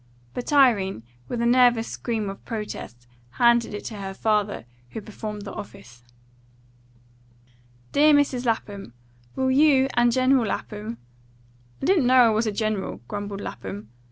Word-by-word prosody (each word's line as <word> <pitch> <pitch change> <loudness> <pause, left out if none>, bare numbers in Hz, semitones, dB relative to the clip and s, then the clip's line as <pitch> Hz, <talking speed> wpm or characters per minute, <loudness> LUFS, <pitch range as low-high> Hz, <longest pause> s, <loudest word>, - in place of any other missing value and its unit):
But 250 - -5
Irene, 220 - +3 0.2
with 235 -1 -2
a - - +1
nervous 240 -1 +4
scream 225 -4 -3
of 195 0 -7
protest, 210 - -7 0.3
handed 235 -2 +3
it 205 - -7
to 215 - -6
her 195 -1 -6
father, 210 - 0 0.2
who - - -6
performed 210 0 -7
the 200 - -7
office. 125 -13 -11 1.9
"DEAR 300 +2 +5
MRS. 275 -4 +1
LAPHAM: 200 - -3 0.4
"Will 260 0 +1
you 270 -1 +4
and 240 0 +3
General 255 -1 +3
Lapham 215 +3 -5 0.4
" 120 0 -32
"I - - 0
didn't 345 -10 +3
know 255 0 +6
I - - +5
was 220 +1 0
a - - 0
general," 215 -1 -3
grumbled 205 -1 -5
Lapham. 105 - -7
215 Hz, 150 wpm, -24 LUFS, 195-245 Hz, 1.9 s, know